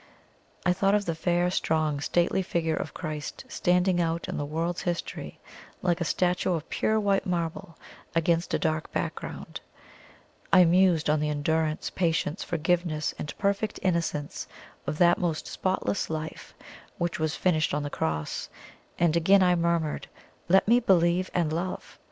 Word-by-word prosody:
I 180 Hz, -, +4 dB
thought 195 Hz, +2 st, +2 dB
of 205 Hz, -1 st, +1 dB
the 165 Hz, -, -1 dB
fair, 175 Hz, +2 st, +1 dB
strong, 155 Hz, -4 st, 0 dB
stately 175 Hz, +5 st, +1 dB
figure 165 Hz, -3 st, -1 dB
of 155 Hz, -, -4 dB
Christ, 155 Hz, -3 st, -5 dB
standing 180 Hz, 0 st, +2 dB
out 165 Hz, 0 st, -1 dB
in -, -, -4 dB
the 145 Hz, -, -2 dB
world's 165 Hz, +3 st, -2 dB
history, 175 Hz, -1 st, -4 dB, 0.4 s
like 175 Hz, -1 st, +1 dB
a -, -, +1 dB
statue 180 Hz, +2 st, +1 dB
of 160 Hz, -2 st, -3 dB
pure 220 Hz, 0 st, +1 dB
white 200 Hz, -2 st, +1 dB
marble 170 Hz, 0 st, -3 dB, 0.4 s
against 165 Hz, +1 st, +1 dB
a -, -, +3 dB
dark 155 Hz, -1 st, -1 dB
background; -, -, -5 dB, 0.9 s
I 180 Hz, -, +7 dB
mused 175 Hz, -2 st, +4 dB
on 150 Hz, 0 st, +3 dB
the 150 Hz, 0 st, 0 dB
endurance, 155 Hz, +1 st, 0 dB
patience, 165 Hz, -1 st, 0 dB
forgiveness, 170 Hz, -2 st, 0 dB
and 150 Hz, -, -6 dB
perfect 200 Hz, +1 st, 0 dB
innocence 165 Hz, -5 st, -1 dB, 0.4 s
of 145 Hz, +2 st, -2 dB
that 175 Hz, 0 st, +5 dB
most 165 Hz, -3 st, -1 dB
spotless 190 Hz, +1 st, -1 dB
life 160 Hz, 0 st, -6 dB, 0.4 s
which 170 Hz, -1 st, -2 dB
was 155 Hz, -1 st, 0 dB
finished 160 Hz, -4 st, +1 dB
on 150 Hz, 0 st, -1 dB
the 145 Hz, -, -4 dB
cross, 75 Hz, -1 st, -2 dB, 0.5 s
and 170 Hz, -2 st, +2 dB
again 190 Hz, +4 st, +5 dB
I 180 Hz, -1 st, +4 dB
murmured, 170 Hz, -3 st, 0 dB, 0.4 s
"Let 190 Hz, +3 st, +5 dB
me 235 Hz, +2 st, +6 dB
believe 180 Hz, -4 st, +3 dB
and 165 Hz, -3 st, +1 dB
love!" 180 Hz, +3 st, -4 dB
170 Hz, 155 wpm, -27 LUFS, 155-180 Hz, 0.9 s, I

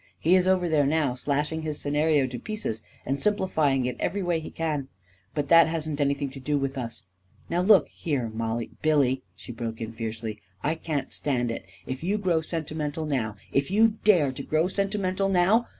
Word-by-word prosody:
He 175 Hz, +4 st, +4 dB
is 185 Hz, 0 st, +3 dB
over 185 Hz, -2 st, +3 dB
there 150 Hz, -4 st, +3 dB
now, 150 Hz, -3 st, +2 dB
slashing 145 Hz, +5 st, -1 dB
his 155 Hz, -2 st, -3 dB
scenario 150 Hz, 0 st, +2 dB
to 125 Hz, -2 st, -5 dB
pieces 210 Hz, -, -4 dB, 0.2 s
and 135 Hz, +2 st, -1 dB
simplifying 155 Hz, -11 st, +1 dB
it 125 Hz, -1 st, -2 dB
every 200 Hz, 0 st, -1 dB
way 175 Hz, -2 st, +1 dB
he 160 Hz, -, -7 dB
can. 150 Hz, -4 st, -2 dB, 0.5 s
But 145 Hz, -2 st, -1 dB
that 165 Hz, -1 st, +8 dB
hasn't 155 Hz, -2 st, -2 dB
anything 140 Hz, -1 st, 0 dB
to 135 Hz, -, -9 dB
do 145 Hz, +3 st, 0 dB
with 135 Hz, -1 st, -2 dB
us. 115 Hz, -6 st, -5 dB, 0.5 s
Now, 175 Hz, +1 st, +2 dB
look 195 Hz, +1 st, +6 dB
here, 130 Hz, -8 st, -2 dB
Mollie.. 115 Hz, 0 st, -2 dB
." -, -, -29 dB
" -, -, -39 dB
Billy," 140 Hz, -4 st, +3 dB
she -, -, -10 dB
broke 115 Hz, -1 st, -5 dB
in 115 Hz, 0 st, -4 dB
fiercely, 110 Hz, -1 st, -5 dB
" 95 Hz, -, -33 dB
I 155 Hz, -, +2 dB
can't 155 Hz, -4 st, -3 dB
stand 125 Hz, -5 st, 0 dB
it -, -, -5 dB, 0.2 s
I -, -, -4 dB
If 130 Hz, +4 st, -5 dB
you 200 Hz, +4 st, +1 dB
grow 180 Hz, -5 st, +1 dB
sentimental 155 Hz, -1 st, -3 dB
now 120 Hz, -8 st, -1 dB
— -, -, -28 dB
if 140 Hz, -, -11 dB
you 215 Hz, +2 st, +3 dB
dare 175 Hz, -10 st, +5 dB
to 130 Hz, -, -7 dB
grow 155 Hz, +4 st, +1 dB
sentimental 195 Hz, 0 st, 0 dB
now 195 Hz, +6 st, +3 dB
150 Hz, 210 wpm, -26 LUFS, 130-175 Hz, 0.5 s, that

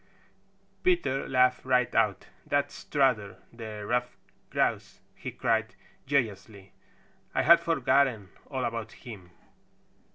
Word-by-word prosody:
Peter 345 Hz, -, +1 dB
laughed 125 Hz, -1 st, +3 dB
right 125 Hz, -2 st, +2 dB
out. 105 Hz, -5 st, +1 dB, 0.2 s
"That's 145 Hz, 0 st, 0 dB
Strutter 125 Hz, -9 st, 0 dB, 0.2 s
the 110 Hz, -3 st, -7 dB
Stuffed 125 Hz, +1 st, -1 dB, 0.3 s
Grouse!" -, -, -1 dB
he -, -, -7 dB
cried -, -, -1 dB, 0.3 s
joyously. 105 Hz, -7 st, -2 dB, 0.6 s
"I -, -, +2 dB
had 170 Hz, +1 st, +8 dB
forgotten 135 Hz, -, +1 dB, 0.2 s
all 130 Hz, -2 st, -2 dB
about 115 Hz, -1 st, -4 dB
him. 100 Hz, -7 st, -11 dB
125 Hz, 105 wpm, -28 LUFS, 110-135 Hz, 0.6 s, had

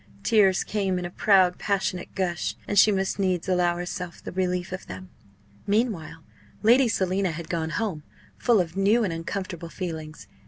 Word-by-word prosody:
Tears 200 Hz, -5 st, +4 dB
came 195 Hz, -3 st, -1 dB
in 180 Hz, -, -3 dB
a 175 Hz, -, -5 dB
proud, 185 Hz, -2 st, +3 dB
passionate 190 Hz, -3 st, -2 dB
gush; 180 Hz, -3 st, -1 dB
and 205 Hz, -, +3 dB
she 215 Hz, -, +7 dB
must 195 Hz, 0 st, -1 dB
needs 185 Hz, -3 st, 0 dB
allow 180 Hz, -2 st, +2 dB
herself 175 Hz, 0 st, -5 dB
the -, -, -6 dB
relief 180 Hz, -1 st, -1 dB
of 185 Hz, -, -6 dB
them. 95 Hz, 0 st, -9 dB, 0.6 s
Meanwhile, 200 Hz, -7 st, -1 dB, 0.4 s
Lady 245 Hz, +4 st, +6 dB
Selina 190 Hz, -3 st, 0 dB
had 165 Hz, 0 st, -6 dB
gone 160 Hz, -2 st, -1 dB
home 180 Hz, -2 st, -2 dB, 0.3 s
full 235 Hz, -4 st, +3 dB
of 170 Hz, -1 st, -2 dB
new 205 Hz, +4 st, +3 dB
and 185 Hz, -5 st, -1 dB
uncomfortable 170 Hz, 0 st, -5 dB
feelings. 160 Hz, -4 st, -6 dB
185 Hz, 165 wpm, -25 LUFS, 175-200 Hz, 0.6 s, she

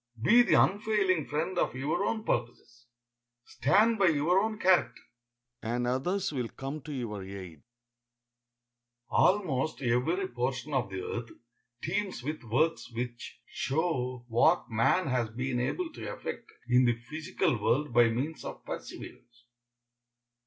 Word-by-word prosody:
Be 235 Hz, -, +6 dB
the 240 Hz, -, +3 dB
unfailing 195 Hz, -4 st, +2 dB
friend 165 Hz, +5 st, -1 dB
of -, -, 0 dB
your 150 Hz, +8 st, -1 dB
own 220 Hz, +1 st, -1 dB
purposes, 120 Hz, -, -3 dB, 0.6 s
stand 215 Hz, +10 st, +3 dB
by 195 Hz, -, +5 dB
your 160 Hz, +4 st, +3 dB
own 215 Hz, +1 st, -1 dB
character, 175 Hz, -, +2 dB, 0.6 s
and 120 Hz, +2 st, -1 dB
others 180 Hz, +11 st, 0 dB
will 125 Hz, -4 st, -2 dB
come 135 Hz, +3 st, -6 dB
to 150 Hz, -, -8 dB
your 115 Hz, -8 st, -4 dB
aid. 95 Hz, -5 st, -9 dB, 1.5 s
Almost 155 Hz, -9 st, +2 dB
every 130 Hz, +11 st, +1 dB
portion 130 Hz, +3 st, -3 dB
of 130 Hz, -7 st, 0 dB
the 95 Hz, -1 st, -5 dB
earth 115 Hz, -1 st, -4 dB, 0.5 s
teems 180 Hz, -, -2 dB
with 150 Hz, +1 st, -4 dB
works 140 Hz, +6 st, 0 dB
which 120 Hz, 0 st, -6 dB
show 130 Hz, -5 st, -2 dB
what 120 Hz, +7 st, +3 dB
man 115 Hz, +11 st, +3 dB
has 125 Hz, -5 st, 0 dB
been 125 Hz, +2 st, -2 dB
able 325 Hz, -, -2 dB
to -, -, -6 dB
effect -, -, -7 dB, 0.2 s
in 125 Hz, +1 st, +5 dB
the 120 Hz, -1 st, +3 dB
physical 130 Hz, -2 st, -2 dB
world 125 Hz, +5 st, +1 dB
by 120 Hz, -1 st, +6 dB
means 135 Hz, +8 st, -3 dB
of -, -, -8 dB
perseverance. 120 Hz, 0 st, -9 dB
135 Hz, 135 wpm, -30 LUFS, 120-175 Hz, 1.5 s, Be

